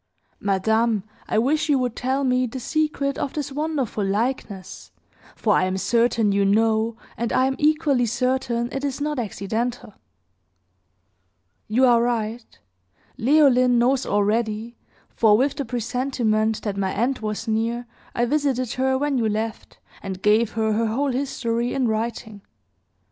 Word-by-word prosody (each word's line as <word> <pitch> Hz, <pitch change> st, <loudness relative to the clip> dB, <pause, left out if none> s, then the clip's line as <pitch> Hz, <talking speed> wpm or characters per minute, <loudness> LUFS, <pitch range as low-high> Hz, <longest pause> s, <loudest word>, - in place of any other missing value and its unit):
Madame, 220 Hz, +2 st, +1 dB, 0.2 s
I -, -, 0 dB
wish 295 Hz, +8 st, +1 dB
you 285 Hz, -, +4 dB
would 250 Hz, -3 st, -1 dB
tell 265 Hz, +2 st, -1 dB
me 255 Hz, -1 st, +2 dB
the 260 Hz, +3 st, -6 dB
secret 290 Hz, 0 st, -1 dB
of 275 Hz, -, -3 dB
this 290 Hz, -2 st, -4 dB
wonderful 285 Hz, -7 st, -2 dB
likeness; 205 Hz, -1 st, -3 dB, 0.4 s
for 210 Hz, -, +1 dB
I -, -, +3 dB
am 185 Hz, +1 st, -1 dB
certain 230 Hz, 0 st, +2 dB
you 200 Hz, 0 st, +2 dB
know, 220 Hz, +2 st, +2 dB, 0.2 s
and 235 Hz, 0 st, -2 dB
I 255 Hz, -, +3 dB
am 265 Hz, 0 st, 0 dB
equally 295 Hz, -5 st, +2 dB
certain 240 Hz, 0 st, 0 dB
it 270 Hz, -, -4 dB
is 280 Hz, -1 st, -2 dB
not 295 Hz, -1 st, -2 dB
accidental." 225 Hz, +1 st, -3 dB, 1.7 s
"You 245 Hz, +5 st, +3 dB
are 240 Hz, -2 st, +5 dB
right. 230 Hz, -1 st, -2 dB, 0.6 s
Leoline 255 Hz, -2 st, +4 dB
knows 255 Hz, +2 st, +2 dB
already; 215 Hz, +2 st, 0 dB, 0.3 s
for, 215 Hz, -2 st, +3 dB
with 275 Hz, +4 st, +1 dB
the 280 Hz, -, -3 dB
presentiment 235 Hz, -2 st, -1 dB
that 205 Hz, -2 st, -3 dB
my 190 Hz, -1 st, 0 dB
end 245 Hz, +5 st, 0 dB
was 215 Hz, +1 st, -4 dB
near, 230 Hz, +2 st, -1 dB, 0.3 s
I 240 Hz, -, +2 dB
visited 255 Hz, -3 st, 0 dB
her 265 Hz, 0 st, +2 dB
when 280 Hz, -1 st, 0 dB
you 225 Hz, -2 st, +1 dB
left, 220 Hz, +1 st, -4 dB, 0.2 s
and 190 Hz, -1 st, -6 dB
gave 215 Hz, +1 st, +3 dB
her 220 Hz, -1 st, 0 dB
her 225 Hz, +1 st, +1 dB
whole 270 Hz, +6 st, 0 dB
history, 245 Hz, -2 st, -2 dB
in 260 Hz, -3 st, +1 dB
writing. 220 Hz, -1 st, -3 dB
235 Hz, 150 wpm, -23 LUFS, 220-265 Hz, 1.7 s, are